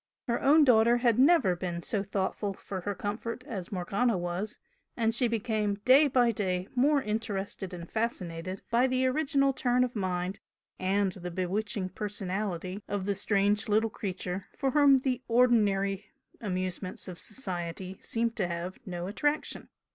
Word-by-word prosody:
Her 235 -1 0
own 300 +3 +6
daughter 235 -2 +5
had 240 -1 +2
never 270 - +5
been 175 -1 -4
so 205 - -1
thoughtful 195 0 -2
for 190 -1 -6
her 205 +2 -3
comfort 230 +5 -4
as 195 -10 -6
Morgana 200 +4 0
was, 175 +4 -3 0.4
and 225 -1 +2
she 245 +1 +2
became 215 -2 0
day 275 +4 +7
by 245 -3 +3
day 185 -3 -2
more 280 +2 +3
interested 205 -3 -3
and 170 -2 -7
fascinated 185 -5 -3
by 240 +3 +4
the 255 0 +1
original 275 0 +2
turn 250 -1 +2
of 250 -1 -3
mind 185 -1 -2 0.4
and 195 +1 +1
the 180 -1 -6
bewitching 185 +2 -2
personality 195 -1 -3
of 200 -2 -2
the 200 - +1
strange 205 +2 +1
little 220 +1 +2
creature 185 -2 -4
for 270 -2 0
whom 285 -1 +6
the 255 -1 -1
ordinary 210 -5 +3 0.3
amusements 185 -2 -3
of 180 -2 -6
society 185 -4 -5
seemed 230 0 -1
to 190 -5 +1
have 175 +2 -5
no 175 -1 -4
attraction. 290 +10 -2
205 Hz, 155 wpm, -29 LUFS, 185-240 Hz, 0.4 s, day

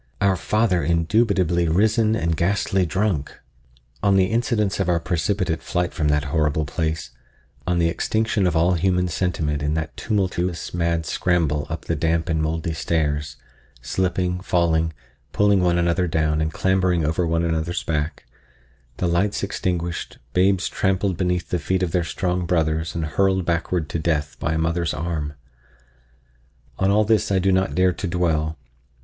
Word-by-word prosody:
—our 100 -2 +3
father 95 -1 +1
indubitably 85 +1 +2
risen 110 +6 +2
and 85 -6 0
ghastly 95 +1 +1
drunk! 95 -5 -1 0.6
On 100 -1 +3
the 95 -1 +5
incidents 115 -4 0
of 95 -2 0
our 85 -1 +2
precipitate 85 0 -1
flight 90 0 -2
from 80 -5 0
that 75 0 +2
horrible 75 -1 +1
place—on 80 0 -5
the 85 -1 +3
extinction 110 +3 0
of 85 - 0
all 85 +3 +3
human 90 +1 +1
sentiment 80 -4 -1
in 75 +1 0
that 80 -1 -3
tumultuous, 95 -4 -2
mad 85 -1 0
scramble 75 -5 0
up 80 0 -5
the 85 - -1
damp 80 +2 0
and 80 -1 +1
mouldy 80 +1 -2
stairs—slipping, 75 +3 -2
falling, 80 -3 +1 0.4
pulling 100 -1 +4
one 90 -1 +2
another 85 +1 +1
down 80 -1 +1
and 80 0 0
clambering 95 -2 +1
over 80 +3 0
one 85 +1 +1
another's 80 +1 -1
back—the 70 -3 -6
lights 90 +5 0
extinguished, 90 -3 -3 0.2
babes 95 0 +3
trampled 95 -1 0
beneath 90 0 -1
the 90 - 0
feet 95 +3 0
of 85 - -1
their 90 -1 +1
strong 90 +1 -2
brothers 80 -1 0
and 80 -2 -1
hurled 95 +3 +1
backward 85 -1 -1
to 85 - -2
death 75 -3 -1
by 75 +2 -1
a - - 0
mother's 80 0 0
arm!—on 75 -2 -3 1.5
all 105 +2 +3
this 110 -1 +2
I 95 - +3
do 95 +1 +2
not 95 +1 +1
dare 90 0 +3
to 95 - -4
dwell. 80 -3 0
85 Hz, 155 wpm, -22 LUFS, 80-95 Hz, 1.5 s, the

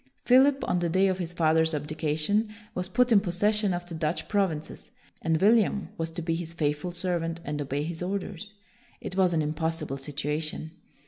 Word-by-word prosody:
Philip, 270 +2 +5
on 180 - +1
the 175 -1 0
day 190 +4 +3
of 185 0 -1
his 175 -2 -3
father's 160 -1 +2
abdication, 155 +8 0 0.2
was 180 0 -3
put 245 +6 +2
in 215 - +7
possession 205 +2 +1
of 175 0 -3
the 175 - -9
Dutch 160 0 -2
provinces, 185 -7 -1 0.3
and 160 -1 +1
William 210 0 +3
was 165 0 -3
to 165 +1 -5
be 165 0 0
his 165 0 -4
faithful 150 +1 -1
serv 175 0 0
ant 165 0 -3
and 150 0 -3
obey 140 +1 -2
his 165 +1 -5
orders. 200 +2 -4 0.4
It 185 - -6
was 190 -2 +4
an 160 -2 +1
im 150 +1 -1
possible 160 -3 -2
situation. 150 +3 -3
170 Hz, 190 wpm, -27 LUFS, 155-190 Hz, 0.4 s, in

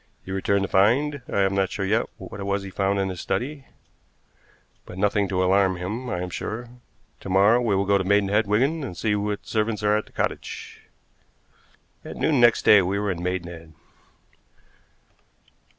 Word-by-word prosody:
He 95 - -7
returned 95 +1 0
to - - -1
find 130 +10 +2
I 100 - +1
am 95 0 +2
not 95 -1 +1
sure 100 - -3
yet 110 +4 +1
what 95 +2 -9
it - - -4
was 100 0 -1
he 95 - -8
found 100 +1 0
in 95 -1 0
his 90 -2 -6
study, 135 +8 -3 1.2
but 90 - -11
nothing 100 0 +1
to 95 0 0
alarm 95 0 +3
him, 110 +8 -5
I 90 - -2
am 90 - -6
sure. 115 +6 -5 0.5
To - - -8
morrow 100 +6 +4
we 110 -5 +1
will 100 +1 +1
go 100 0 +3
to - - -1
Maidenhead, 100 +2 +2
Wigan, 135 +10 +1
and 90 -10 -6
see 110 -2 0
what 105 0 -3
servants 110 -1 -1
are 105 0 +3
at 105 - -2
the - - -19
cottage." - - -4 1.2
At - - -8
noon 150 -4 +2
next 120 -1 +4
day 105 - +8
we 95 +2 -1
were 100 -1 -1
in 85 -1 -5
Maidenhead. 85 -3 -5
100 Hz, 185 wpm, -24 LUFS, 95-110 Hz, 1.2 s, day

